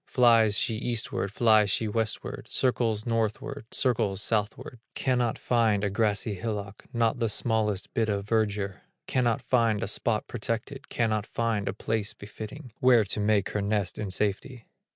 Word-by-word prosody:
Flies 115 Hz, -4 st, +4 dB
she 110 Hz, -, +1 dB
eastward, 115 Hz, -4 st, -2 dB
flies 110 Hz, -2 st, +4 dB
she 110 Hz, +3 st, +1 dB
westward, 110 Hz, +1 st, -3 dB
Circles 115 Hz, -4 st, +1 dB
northward, 115 Hz, +3 st, -2 dB
circles 110 Hz, -7 st, +1 dB
southward, 115 Hz, +5 st, -2 dB, 0.2 s
Cannot 125 Hz, -3 st, 0 dB
find 110 Hz, -4 st, +1 dB
a 100 Hz, -, 0 dB
grassy 105 Hz, 0 st, 0 dB
hillock, 100 Hz, -1 st, -5 dB
Not 115 Hz, 0 st, +1 dB
the 115 Hz, -2 st, +1 dB
smallest 105 Hz, -3 st, 0 dB
bit 110 Hz, -1 st, +1 dB
of 100 Hz, -1 st, -2 dB
verdure; 105 Hz, -3 st, 0 dB, 0.2 s
Cannot 120 Hz, -3 st, 0 dB
find 115 Hz, -4 st, +2 dB
a -, -, -2 dB
spot 110 Hz, -2 st, 0 dB
protected, 115 Hz, +3 st, -4 dB
Cannot 110 Hz, -3 st, 0 dB
find 115 Hz, -3 st, -1 dB
a -, -, -2 dB
place 110 Hz, +1 st, -2 dB
befitting, 110 Hz, +3 st, -9 dB
Where 125 Hz, -3 st, +5 dB
to 100 Hz, +1 st, -1 dB
make 105 Hz, -1 st, +2 dB
her 105 Hz, -, -2 dB
nest 100 Hz, -2 st, -1 dB
in 105 Hz, -2 st, -3 dB
safety. 105 Hz, +5 st, -2 dB
110 Hz, 150 wpm, -27 LUFS, 105-115 Hz, 0.2 s, Where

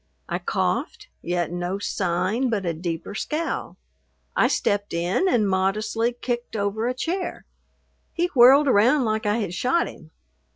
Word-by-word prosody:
I -, -, -2 dB
coughed, 420 Hz, -3 st, -2 dB
yet 175 Hz, -2 st, -1 dB
no 175 Hz, +2 st, -2 dB
sign 200 Hz, +5 st, -1 dB
but 205 Hz, -5 st, -1 dB
a 170 Hz, -, 0 dB
deeper 165 Hz, +2 st, -5 dB
scowl. 310 Hz, +9 st, -3 dB, 0.6 s
I -, -, +4 dB
stepped 205 Hz, -3 st, 0 dB
in 180 Hz, -, +1 dB
and 220 Hz, -, +2 dB
modestly 210 Hz, +5 st, 0 dB
kicked 240 Hz, -1 st, -4 dB
over 210 Hz, +2 st, -1 dB
a 250 Hz, -, -1 dB
chair. 355 Hz, +7 st, -3 dB, 0.7 s
He 345 Hz, -, 0 dB
whirled 270 Hz, +3 st, +7 dB
around 250 Hz, +4 st, +4 dB
like 215 Hz, -1 st, -1 dB
I 205 Hz, +2 st, +2 dB
had 200 Hz, -6 st, -3 dB
shot 255 Hz, -, +1 dB
him. 155 Hz, -, -12 dB
215 Hz, 150 wpm, -24 LUFS, 185-255 Hz, 0.7 s, whirled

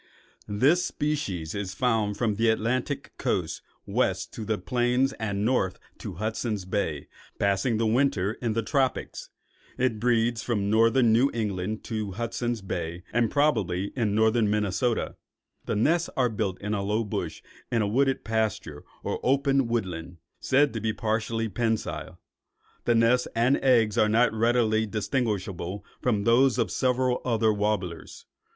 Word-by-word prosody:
This 140 Hz, +13 st, +3 dB
species 105 Hz, -, -2 dB
is 100 Hz, -2 st, -4 dB
found 110 Hz, -5 st, +1 dB
from 110 Hz, -2 st, +1 dB
the 115 Hz, +2 st, +2 dB
Atlantic 125 Hz, +5 st, -1 dB
coast 90 Hz, -10 st, -1 dB, 0.2 s
west -, -, -1 dB
to 110 Hz, -, -6 dB
the 110 Hz, 0 st, -1 dB
plains 125 Hz, +6 st, +1 dB
and 100 Hz, -1 st, -1 dB
north 110 Hz, -7 st, +1 dB, 0.2 s
to -, -, -6 dB
Hudson's 110 Hz, 0 st, -2 dB
Bay, 90 Hz, -7 st, -2 dB, 0.3 s
passing 100 Hz, +4 st, +1 dB
the 115 Hz, -, +1 dB
winter 110 Hz, -4 st, +2 dB
in 115 Hz, -3 st, 0 dB
the 115 Hz, +1 st, -1 dB
tropics. 135 Hz, +1 st, -1 dB, 0.5 s
It 125 Hz, -4 st, 0 dB
breeds 115 Hz, 0 st, +2 dB
from 105 Hz, -4 st, -1 dB
northern 115 Hz, +1 st, +4 dB
New 125 Hz, +5 st, +4 dB
England 105 Hz, -1 st, -2 dB
to 110 Hz, -4 st, -4 dB
Hudson's 115 Hz, 0 st, -3 dB
Bay 85 Hz, -2 st, -4 dB
and 120 Hz, -2 st, +2 dB
probably 100 Hz, -, +1 dB
in 110 Hz, -5 st, 0 dB
northern 110 Hz, 0 st, +3 dB
Minnesota. 105 Hz, +3 st, 0 dB, 0.5 s
The -, -, 0 dB
nest 165 Hz, +11 st, +2 dB
is 125 Hz, -2 st, +3 dB
built 95 Hz, -4 st, -2 dB
in 105 Hz, +1 st, -3 dB
a 100 Hz, -, -1 dB
low 105 Hz, +3 st, 0 dB
bush 105 Hz, -, -4 dB, 0.3 s
in 115 Hz, -2 st, +2 dB
a -, -, 0 dB
wooded 135 Hz, +5 st, +1 dB
pasture 110 Hz, -9 st, -2 dB, 0.2 s
or -, -, -2 dB
open 135 Hz, -1 st, +2 dB
woodland, 90 Hz, -7 st, -3 dB, 0.2 s
said 140 Hz, -1 st, +3 dB
to 115 Hz, -, -3 dB
be 110 Hz, 0 st, 0 dB
partially 115 Hz, +1 st, -1 dB
pensile. 110 Hz, +1 st, -2 dB, 0.7 s
The 120 Hz, -, +3 dB
nest 115 Hz, +2 st, +3 dB
and 120 Hz, +4 st, +3 dB
eggs 115 Hz, -6 st, +3 dB
are 105 Hz, -, +4 dB
not 115 Hz, +2 st, +3 dB
readily 110 Hz, -1 st, +2 dB
distinguishable 100 Hz, -, -2 dB, 0.2 s
from 105 Hz, -5 st, +1 dB
those 125 Hz, +3 st, +4 dB
of 115 Hz, -, 0 dB
several 125 Hz, -1 st, +1 dB
other 115 Hz, -3 st, +2 dB
warblers. 100 Hz, -5 st, -3 dB
110 Hz, 150 wpm, -27 LUFS, 105-125 Hz, 0.7 s, northern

